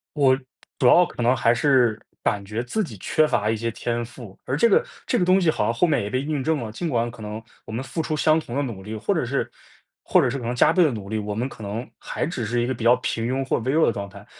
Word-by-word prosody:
我 135 -3 +4 0.4
主 125 - +2
要 175 +6 +7
可 120 - -6
能 125 +2 +3
还 120 0 +3
是 120 -4 +3 0.2
感 100 -1 0
觉 105 +4 -3
自 215 - -1
己 120 - -7
缺 155 +10 +2
乏 105 -7 0
一 110 - 0
些 115 +1 -2
天 120 +1 -3
赋， 115 -4 -11
而 135 - -1
这 235 - +4
个 200 - +4 0.2
这 - - +1
个 180 - +2
东 185 +2 +4
西 170 - +1
好 105 - -1
像 115 - +1
后 145 +9 +2
面 145 -9 +1
也 100 - -4
被 130 - 0
印 145 -1 -2
证 160 0 +1
了。 110 -1 -6
尽 165 +9 -3
管 120 -3 0
可 115 -2 -12
能 105 +1 -5 0.2
我 - - -11
们 120 +4 -3
付 160 +4 -3
出 155 0 -2
相 155 +1 +3
同 125 -3 -7
的 145 - +1
努 110 -8 -5
力， 110 +2 -6
或 - - 0
者 - - 0
是 - - -1 0.5
或 - - +4
者 - - +2
是 135 - -2
可 125 - -6
能 120 +1 -2
加 - - +4
倍 180 - +4
的 155 - +4
努 105 -4 -6
力， 110 - -2
我 105 0 -4
们 120 +5 -2
可 110 - -12
能 105 +5 -5
还 - - -3
只 135 -9 -3
是 120 +2 0
一 120 - 0
个 130 - -1
比 115 - -8
较 120 +2 +6
平 115 -2 -3
庸 130 +2 -1
或 - - +2
微 130 +3 -1
弱 160 +1 +4
的 - - +2
状 100 0 -5
态。 100 +1 -13
120 Hz, 325 characters per minute, -23 LUFS, 110-145 Hz, 0.5 s, 要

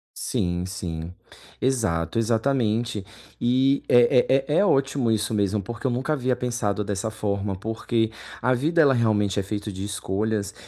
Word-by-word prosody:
Sim, 90 0 -2
sim, 85 -2 -5 0.5
exato, 110 - 0
exatamente 115 -2 0 0.3
e 130 +3 +2
é 125 +2 +4
é 150 - -1
é - - +4
é 205 - +4
ótimo 135 - +2
isso 110 0 0
mesmo, 100 0 +1
porque 115 +5 -8
eu 130 - +2
nunca 130 +5 -1
havia 130 -3 0
pensado 115 -5 -1
dessa 100 +2 -3
forma, 100 -2 -2
porque 110 +2 -1 0.3
a 125 +2 +3
vida 160 +7 +2
ela 140 -3 +5
realmente 105 -4 +1
é 100 - -1
feito 105 +1 -4
de 95 0 -6
escolhas. 100 +1 -2
110 Hz, 155 wpm, -24 LUFS, 100-125 Hz, 0.5 s, ela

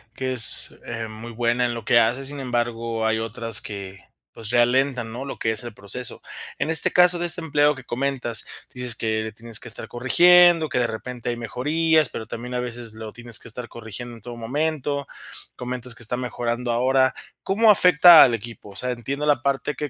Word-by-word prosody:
que 130 -1 -3
es, 115 -4 +3
eh, 115 -1 -5
muy 110 +2 -10
buena 120 +1 0
en 120 - -2
lo 115 -2 -8
que 120 - +4
hace, 120 +4 0
sin 140 +1 -7
embargo, 115 -2 -2
hay 110 0 +1
otras 115 -1 +1
que, 100 -2 -8 0.3
pues, 110 0 -4
ralentan, 125 0 +1
¿no?, 125 +4 -6
lo 140 - -8
que - - -1
es 110 +1 -2
el 120 -3 -8
proceso. 105 +6 -5 0.4
En - - -1
este 160 -1 +5
caso, 180 0 +5
de 175 - -1
este 175 +1 +3
empleado 150 -2 +2
que 135 - -12
comentas, 125 -2 -3 0.3
dices 125 -2 -1
que 110 -1 -2
le 110 - -6
tienes 115 +1 -3
que 120 - -10
estar 115 - -8
corrigiendo, 170 +6 +5
que - - -2
de 120 - +2
repente 120 +2 -6
hay 120 - -2
mejorías, 150 +5 +1
pero 110 - -7
también 125 +2 -7
a 125 - -1
veces 120 -2 -5
lo 110 -1 -9
tienes 120 -1 -6
que - - -12
estar 120 +1 -6
corrigiendo 120 +1 -9
en 115 - -15
todo 120 +1 -9
momento, 145 +3 -3 0.5
comentas 125 -1 -5
que 120 - -6
está 120 +2 +1
mejorando 120 -1 -3
ahora. 130 +2 +2 0.3
¿Cómo 215 +3 +4
afecta 175 -3 +8
al 120 - +3
equipo? 115 -1 -10
O - - -16
sea, 125 +6 -2
entiendo 135 +5 -4
la 145 -4 +2
parte 140 +2 -1
que 150 +2 -4
120 Hz, 210 wpm, -22 LUFS, 115-140 Hz, 0.5 s, afecta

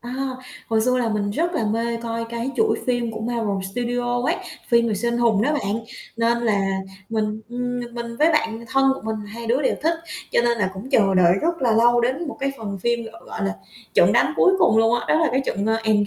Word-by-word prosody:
À, 240 +1 -7 0.5
hồi 220 -1 +1
xưa 255 +2 +2
là 240 - 0
mình 205 -2 -1
rất 340 +10 -1
là 315 -10 0
mê 230 +2 -1
coi 230 0 -3
cái 235 +2 -4
chuỗi 440 -1 +2
phim 245 -2 0
của 220 0 -6
Marvel 225 -3 -1 0.2
Studio 245 +1 -1
ấy, - - +1 0.3
phim 235 -1 +4
về 215 - 0
siêu 235 +4 -1
anh 235 - -1
hùng 225 -3 +3
đó 295 - +2
bạn, 225 -5 -2 0.3
nên 235 +1 +2
là 215 -4 +1 0.5
mình, 215 -1 -1
ừm, 245 +1 -3
mình 240 -1 -8
mình 235 -1 -5
với 320 +2 +4
bạn 225 -6 0
thân 270 +1 +3
của - - -9
mình 220 0 -2
hai 230 +3 -8
đứa 250 +5 +1
đều - - +2
thích 330 +2 +2 0.4
cho - - +4
nên 235 -1 +1
là 190 -3 +1
cũng 205 +8 -8
chờ 200 -7 +4
đợi 175 -2 +5
rất 335 -2 0
là 240 - +3
lâu 240 +2 +4
đến 260 +7 -1
một - - -6
cái 275 0 0
phần 200 -3 -5
phim 235 +4 0
gọi 230 - -14
gọi 100 - -5
là, 95 0 -1 0.4
"Trận - - +5
đánh - - +3
cuối 375 - +5
cùng" 220 - +4
luôn 225 +1 +4
á, - - -7
đó 315 - +3
là 320 - +3
cái 260 - +2
trận, 200 +1 -1
à, 220 0 +2
Endg 210 -2 +3
235 Hz, 250 wpm, -22 LUFS, 220-245 Hz, 0.5 s, đợi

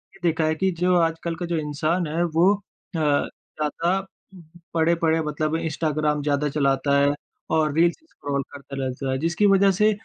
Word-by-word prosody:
ये - - -18
देखा 160 -2 +2
है 155 0 +1
कि 190 +4 +1
जो 180 0 +3
आजकल 165 0 0
का 175 - -4
जो 170 -1 -1
इंसान 155 +3 -1
है 165 +3 0
वो 175 +4 +3 0.4
अ, - - 0
ज़्यादा 155 +4 -1 0.7
पड़े-पड़े 165 0 +2
मतलब 155 +1 -1
इंस्टाग्राम 155 -2 -1
ज़्यादा 145 0 +1
चलाता 140 0 +1
है 140 0 +3 0.4
और 155 -2 +2
रील्स 170 +1 +4
स्क्रॉल 140 -1 -3
करता 140 0 -9
रहता 130 +1 -3
है 130 - 0
जिसकी 170 +6 +1
वज़ह 195 0 +5
से 210 +3 +3
160 Hz, 165 wpm, -24 LUFS, 150-170 Hz, 0.7 s, वज़ह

